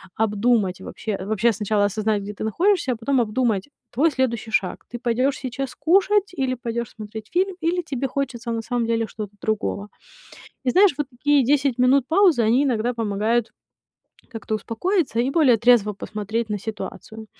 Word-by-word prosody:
обдумать. 210 -3 +1
Вообще 210 +1 -5
вообще 220 +3 +2
сначала 210 0 +1
осознать, 210 0 0
где 205 +1 -6
ты 205 - -7
находишься, 335 - +1
а - - -5
потом 245 +3 +1
обдумать 225 -1 0 0.2
твой 310 +7 +2
следующий 235 -5 -1
шаг. 190 -4 0
Ты 240 - -6
пойдёшь 250 +3 0
сейчас 260 0 -5
кушать 390 +3 +2
или 265 -6 -1
пойдёшь 235 -1 -4
смотреть 215 0 -8
фильм? 375 +1 +1
Или 345 +2 +1
тебе 275 -5 -3
хочется 255 -3 -3
на 230 0 -2
самом 235 0 -2
деле 230 0 +1
что-то 210 -1 -7
другого. 210 -1 -2 0.8
И 250 - +3
знаешь, 385 +2 +5
вот 295 -2 -2
такие 290 +3 0
10 275 -1 +2
минут 255 +1 +3
паузы, 345 -6 +4
они 230 +5 +3
иногда 245 -3 0
помогают 225 +1 0 0.8
как-то 220 -2 -4
успокоиться 235 - -1
и 245 - +1
более 275 -7 +4
трезво 230 -2 +4
посмотреть 215 +3 -4
на 210 -1 -2
ситуацию. 220 +1 -7
235 Hz, 165 wpm, -23 LUFS, 215-275 Hz, 0.8 s, знаешь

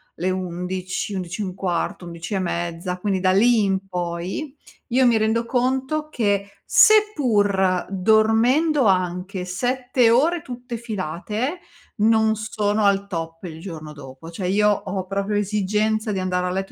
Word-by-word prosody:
le 180 +3 -1
11, 185 +1 -3
11 185 +1 -4
e - - -1
un 185 -1 -6
quarto, 180 -1 -2
11 170 +2 -7
e 195 - +1
mezza, 175 0 -3
quindi 195 0 0
da 185 0 +2
lì 225 +2 +4
in 195 0 -1
poi, 180 - -4 0.3
io 255 +1 +3
mi 235 -2 +4
rendo 220 +2 +1
conto 265 +5 0
che 200 -7 -1
seppur 210 - +4
dormendo 225 - +3
anche 185 0 0
7 245 +5 +1
ore, 315 +9 +3
tutte 245 -2 -7
filate, 215 - -4 0.4
non 220 0 +3
sono 215 -1 -1
al 200 0 +2
top 165 -3 -5
il 160 -3 -7
giorno 160 -4 -8
dopo. 135 +2 -11
Cioè, 180 +2 -4
io 210 +3 +3
ho 190 -2 -2
proprio 200 +2 -2
esigenza 210 +2 0
di 190 - -2
andare 180 -1 -1
a - - -1
letto 195 +1 -3
200 Hz, 150 wpm, -22 LUFS, 180-230 Hz, 0.4 s, lì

